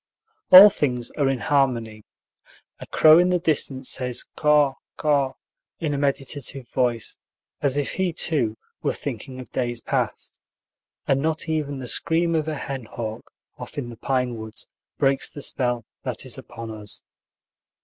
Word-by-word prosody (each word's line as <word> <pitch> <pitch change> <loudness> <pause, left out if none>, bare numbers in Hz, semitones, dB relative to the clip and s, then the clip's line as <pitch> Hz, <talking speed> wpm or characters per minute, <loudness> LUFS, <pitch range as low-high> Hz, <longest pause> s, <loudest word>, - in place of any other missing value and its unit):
All 195 +3 +11
things 125 -7 -1
are 140 -3 +1
in 135 -2 -1
harmony. 120 -7 0 0.8
A - - -9
crow 155 +1 +7
in 180 +1 +4
the 180 - +3
distance 140 -6 0
says 125 -1 0
caw, 150 -2 +4 0.2
caw 140 -3 +1 0.5
in 155 -4 -1
a 140 - -1
meditative 140 -2 -2
voice, 120 -4 -1 0.4
as 140 -1 +1
if 145 - -1
he, 190 -2 0
too, 140 -9 -1 0.2
were - - 0
thinking 130 -1 -6
of 130 - -10
days 120 -2 -2
past; - - -3 0.7
and 135 0 +2
not 160 +2 -1
even 150 -3 -2
the 130 -2 -6
scream 165 +6 +1
of 155 -1 0
a 155 -2 -2
hen 135 -3 -5
hawk, 110 0 -6 0.3
off - - -9
in 130 -4 -3
the - - -9
pine 125 -1 -1
woods, 110 0 -8 0.3
breaks 135 0 +2
the 145 - -7
spell 120 -3 0 0.2
that - - -4
is - - -3
upon 115 -1 -8
us. 105 -2 -5
135 Hz, 160 wpm, -24 LUFS, 120-150 Hz, 0.8 s, All